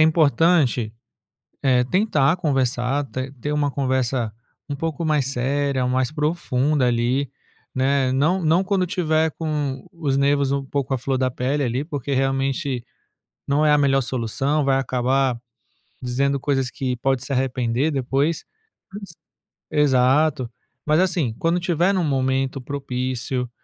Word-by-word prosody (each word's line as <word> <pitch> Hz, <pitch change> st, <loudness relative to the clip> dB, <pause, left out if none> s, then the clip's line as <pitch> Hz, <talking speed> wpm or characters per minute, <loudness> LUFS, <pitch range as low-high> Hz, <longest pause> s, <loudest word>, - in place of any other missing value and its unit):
é -, -, +7 dB
importante, 155 Hz, -7 st, +3 dB, 0.7 s
eh, 125 Hz, -2 st, +4 dB
tentar 165 Hz, -, +2 dB
conversar, 135 Hz, -2 st, 0 dB
ter 130 Hz, +1 st, -5 dB
ter 145 Hz, +4 st, -4 dB
uma 145 Hz, -1 st, +1 dB
conversa 130 Hz, -4 st, 0 dB, 0.4 s
um 145 Hz, -, -2 dB
pouco 160 Hz, +2 st, -3 dB
mais 150 Hz, -4 st, +1 dB
séria, 135 Hz, 0 st, 0 dB
mais 130 Hz, +2 st, 0 dB
profunda 150 Hz, -3 st, 0 dB
ali, 120 Hz, +4 st, 0 dB, 0.4 s
né. 130 Hz, 0 st, +1 dB
Não 165 Hz, +7 st, +1 dB
não 165 Hz, +4 st, +3 dB
quando 190 Hz, -1 st, +1 dB
tiver 160 Hz, -2 st, +1 dB
com 145 Hz, -4 st, -3 dB
os 150 Hz, -6 st, -1 dB
nervos 140 Hz, 0 st, +2 dB
um 140 Hz, -1 st, -1 dB
pouco 135 Hz, -1 st, -2 dB
à -, -, +1 dB
flor 130 Hz, +2 st, -1 dB
da 130 Hz, 0 st, +1 dB
pele 140 Hz, +4 st, -1 dB
ali, 125 Hz, +3 st, -1 dB
porque 145 Hz, -3 st, -4 dB
realmente 135 Hz, 0 st, 0 dB, 0.6 s
não 145 Hz, +2 st, +2 dB
é 150 Hz, -, +4 dB
a 150 Hz, -, +5 dB
melhor 135 Hz, -1 st, +3 dB
solução, 135 Hz, +5 st, -1 dB
vai 135 Hz, -1 st, +3 dB
acabar 130 Hz, 0 st, 0 dB, 0.6 s
dizendo 140 Hz, +3 st, 0 dB
coisas 135 Hz, -3 st, 0 dB
que 130 Hz, -3 st, -3 dB
pode 135 Hz, +1 st, 0 dB
se 140 Hz, -, -5 dB
arrepender 130 Hz, +1 st, 0 dB
depois. 140 Hz, +4 st, 0 dB, 1.3 s
Exato, 135 Hz, -2 st, +2 dB, 0.4 s
mas 155 Hz, +2 st, +3 dB
assim, 170 Hz, -11 st, 0 dB
quando 170 Hz, +2 st, +1 dB
tiver 175 Hz, +2 st, +1 dB
num 185 Hz, -, +1 dB
momento 135 Hz, -1 st, 0 dB
propício 125 Hz, -2 st, -3 dB
135 Hz, 140 wpm, -22 LUFS, 130-150 Hz, 1.3 s, é